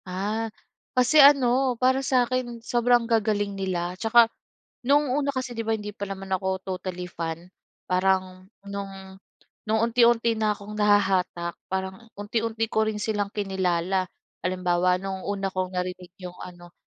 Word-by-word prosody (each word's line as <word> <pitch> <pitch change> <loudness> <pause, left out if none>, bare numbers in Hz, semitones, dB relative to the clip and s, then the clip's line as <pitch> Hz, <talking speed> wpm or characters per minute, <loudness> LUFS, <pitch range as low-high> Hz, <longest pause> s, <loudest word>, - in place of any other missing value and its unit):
Ah, 205 +5 -2 0.5
kasi 255 +5 +6
ano 265 -2 +5
para 260 +2 +3
sakin 255 -2 0
sobrang 240 0 +3
gagaling 215 -3 +1
nila 180 -3 -2
'tsaka 230 +1 +6 0.6
nung 285 0 +3
una 285 0 0
kasi 255 -2 -3
di 230 - -3
ba 225 - +1
hindi 210 -1 -7
pa 200 -1 -6
naman 195 0 -6
ako 190 0 0
totally 185 -1 -4
fan 165 +1 -5 0.4
parang 185 0 0 0.2
nung, 195 -1 -7 0.5
nung 220 +1 +2
unti-unti 235 0 +3
na 215 -1 +2
akong 205 +1 -9
nahahatak 190 -4 +2 0.2
parang 190 +4 -4
unti-unti 225 +2 -1
ko 220 -1 +1
rin 215 - -3
silang 205 -2 -1
kinilala. 190 -2 0 0.4
Halimbawa 180 0 +1
nung 190 -1 -4
una 195 -1 -2
kong 185 0 -2
narinig 180 0 -4
yung 180 -1 -7
ano, 175 -1 -11
200 Hz, 140 wpm, -25 LUFS, 185-230 Hz, 0.6 s, kasi